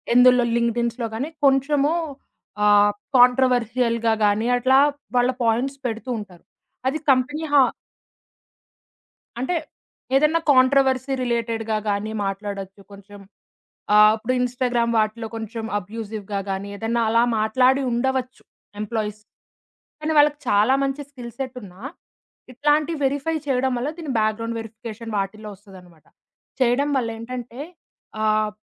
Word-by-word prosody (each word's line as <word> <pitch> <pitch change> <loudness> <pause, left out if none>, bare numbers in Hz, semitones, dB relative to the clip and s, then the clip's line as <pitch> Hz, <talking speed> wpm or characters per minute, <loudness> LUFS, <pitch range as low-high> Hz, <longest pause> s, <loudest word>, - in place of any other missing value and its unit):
ఎందులో 250 -1 +6
లింక్డిన్స్‌లో 235 0 -1
గానీ, 275 +7 -3 0.2
కొంచెము 280 +3 +3 0.7
ఆహ్, 205 0 +5 0.2
కాంట్రోవర్షియల్‌గా 245 -2 +3
గానీ 210 +3 +1
అట్లా 260 +2 +4 0.4
వాళ్ళ 245 +1 +3
పాయింట్స్ 245 +5 0
పెడుతూ 230 +3 -5
ఉంటారు. 185 -5 -12 0.4
అది 305 +4 0
కంపెనీ 290 +5 0
హా 285 - +7 1.8
అంటే 305 +8 -1 0.6
ఏదైనా 305 +4 +3
కాంట్రోవర్సీ 265 0 +3
రిలేటెడ్‌గా 230 -2 -1
గానీ 205 +2 -2
మాట్లాడొచ్చు. 195 0 -5
కొంచెం 200 +1 -13 0.7
ఆహ్, 210 0 +8
ఇప్పుడు 230 +3 -2
ఇన్‌స్టాగ్రామ్ 245 -1 0
వాటిలో 220 +1 0
కొంచెం 225 0 -5
అబ్యూసివ్‌గా 210 0 -6
గానీ 195 +1 -3
ఏదైనా 225 +3 -1
అలా 230 +1 +4 0.2
మాట్లాడి 255 +5 +3
ఉండవచ్చు 255 +1 -2 0.4
ఎంప్లాయీస్. 215 -1 -3 0.8
కానీ, 310 +1 -1
వాళ్ళకి 295 0 +4
చాలా 210 +6 +4
మంచి 275 +1 -2
స్కిల్ 245 -4 -9
సెట్ 260 -1 -5
ఉన్నా, 185 0 -13 0.7
ఇట్లాంటివి 295 +4 +1
వెరిఫై 285 +4 0
చేయడం 260 -1 +1
వల్ల, 270 +5 -2
దీని 310 -6 -4
బ్యాక్‌గ్రౌండ్ 225 +2 -1
వెరిఫికేషన్ 225 0 -8
వాటిలో 210 +2 -4
వస్తదన్నమాట. 185 -5 -17 0.5
చేయడం 260 +4 +2
వల్ల 235 -3 0
ఏంటంటే 245 +1 -7 0.6
ఆహ్, 215 0 +2
235 Hz, 115 wpm, -22 LUFS, 215-265 Hz, 1.8 s, ఆహ్